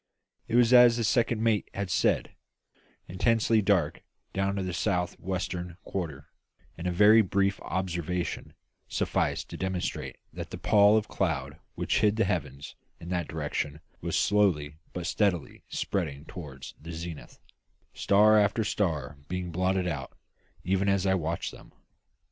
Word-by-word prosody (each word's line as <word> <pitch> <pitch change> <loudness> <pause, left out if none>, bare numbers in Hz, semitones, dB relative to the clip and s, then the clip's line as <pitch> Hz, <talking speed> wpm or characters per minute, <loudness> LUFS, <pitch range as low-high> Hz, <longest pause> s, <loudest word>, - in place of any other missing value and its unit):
It 115 - -2
was, 120 0 +5
as 120 -1 +8
the 115 - 0
second 115 0 +1
mate 110 -3 +1
had 100 -2 -3
said, - - +1 0.8
intensely 110 +3 +2
dark 95 -7 +1 0.3
down 100 +1 0
in 95 - -2
the 90 - -3
south 90 0 0
western 90 -1 -4
quarter; 75 -7 -5 0.5
and 85 +1 -5
a - - +1
very 105 +5 +7
brief 100 0 0
observation 90 -2 -3 0.3
sufficed - - -1
to - - -6
demonstrate 95 -1 -3 0.2
that - - -6
the - - -6
pall 105 0 +5
of 110 - -1
cloud 75 -4 -2 0.2
which - - 0
hid 105 -1 +3
the 115 -1 +2
heavens 75 -7 -3 0.2
in 85 - -9
that 90 -1 -1
direction 75 0 -3 0.2
was - - -1
slowly 80 -8 +2
but 90 -1 -5
steadily 90 -3 -1
spreading 75 -6 -3
toward 70 -7 -9 0.2
the 85 +2 -8
zenith, 80 -1 -7 0.6
star 105 +2 +5
after 105 +2 +2
star 75 -9 -1
being 90 -1 -4
blotted 95 +2 0
out 70 -6 -5 0.5
even 95 +2 +1
as 100 -1 +2
I 95 - +3
watched 85 -2 -2
them. - - -15
95 Hz, 150 wpm, -28 LUFS, 85-105 Hz, 0.8 s, as